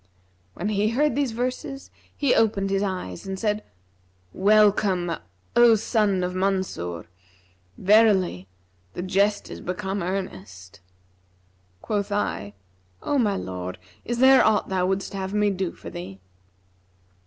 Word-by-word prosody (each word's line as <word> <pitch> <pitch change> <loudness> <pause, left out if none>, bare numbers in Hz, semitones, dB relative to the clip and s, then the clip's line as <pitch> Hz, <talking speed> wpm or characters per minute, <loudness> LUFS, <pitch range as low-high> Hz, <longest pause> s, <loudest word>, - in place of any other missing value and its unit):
'[FN#343] 90 0 -38
When 205 - -3
he 210 0 +1
heard 285 +3 +1
these 280 -3 0
verses 255 +3 -4 0.3
he 280 -4 +2
opened 205 -3 +2
his 195 0 +1
eyes 185 - -4
and 190 0 -4
said; 210 0 -1 0.7
'Welcome, 200 -3 +3 0.4
O 240 -1 +7
son 210 -3 +1
of 180 0 -2
Mansur! 185 - -2 0.7
Verily, 195 - +3 0.5
the 175 - -5
jest 200 +2 +1
is - - -8
become 190 +2 -3
earnest.' 100 - -6 1.0
Quoth 205 -1 -2
I, 100 - -2 0.5
'O 285 - +1
my 210 -5 +2
lord, 90 - -5 0.3
is 240 - -3
there 265 +1 +7
aught 220 -1 +2
thou 185 -1 +1
wouldst 195 +1 -2
have 195 +1 -4
me 210 -1 +2
do 190 -2 -2
for - - -11
thee?' 135 - -8
195 Hz, 130 wpm, -24 LUFS, 175-215 Hz, 1.0 s, O